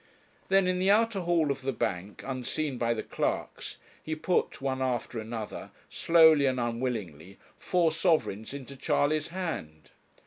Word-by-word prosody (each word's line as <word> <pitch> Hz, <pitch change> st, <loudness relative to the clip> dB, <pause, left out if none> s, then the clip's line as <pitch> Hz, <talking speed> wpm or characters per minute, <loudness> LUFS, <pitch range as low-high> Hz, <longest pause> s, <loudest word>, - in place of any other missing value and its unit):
Then 195 Hz, -1 st, +4 dB
in 180 Hz, 0 st, +1 dB
the 190 Hz, +1 st, +2 dB
outer 220 Hz, 0 st, +3 dB
hall 170 Hz, -4 st, +1 dB
of 135 Hz, -1 st, -4 dB
the 135 Hz, +1 st, -1 dB
bank, 95 Hz, -4 st, -3 dB
unseen 135 Hz, +1 st, -3 dB
by 115 Hz, -1 st, +1 dB
the 110 Hz, -, -4 dB
clerks, -, -, -3 dB, 0.2 s
he 155 Hz, -, -4 dB
put, 175 Hz, +3 st, 0 dB
one 130 Hz, -1 st, -2 dB
after 125 Hz, -2 st, -2 dB
another, 110 Hz, -1 st, -6 dB, 0.2 s
slowly 160 Hz, -4 st, +5 dB
and 130 Hz, -1 st, 0 dB
unwillingly, 115 Hz, -, -3 dB, 0.2 s
four 175 Hz, -3 st, +2 dB
sovereigns 155 Hz, -, 0 dB
into 140 Hz, 0 st, -8 dB
Charley's 145 Hz, +3 st, +1 dB
hand. 165 Hz, -, -5 dB
135 Hz, 145 wpm, -29 LUFS, 115-165 Hz, 0.2 s, slowly